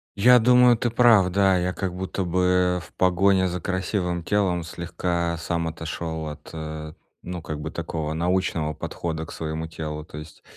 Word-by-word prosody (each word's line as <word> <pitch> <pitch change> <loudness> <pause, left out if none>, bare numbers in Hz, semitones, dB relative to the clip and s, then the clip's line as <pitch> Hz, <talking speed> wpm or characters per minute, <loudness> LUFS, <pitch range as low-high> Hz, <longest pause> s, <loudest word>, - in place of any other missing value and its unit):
Я 125 +5 +6
думаю, 125 +1 +6
ты 120 - 0
прав, 115 -5 +5
да. 95 0 +3
Я 90 +1 -1
как 95 -3 -3
будто 95 +1 -3
бы 90 0 +2
в - - -16
погоне 95 +1 +3
за 90 -1 -4
красивым 90 -2 -2
телом 95 -3 +1
слегка 85 0 -2
сам 85 0 -2
отошел 80 0 -5
от, 75 0 -10
э, 80 -1 -6 0.3
ну, 90 -1 -6
как 75 -1 -5
бы - - -5
такого, 80 -1 -4
научного 85 -2 0
подхода 80 +1 -4
к - - -11
своему 80 0 -4
телу. 75 -2 -6
То 75 - -11
есть 75 +1 -11
90 Hz, 170 wpm, -24 LUFS, 80-95 Hz, 0.3 s, Я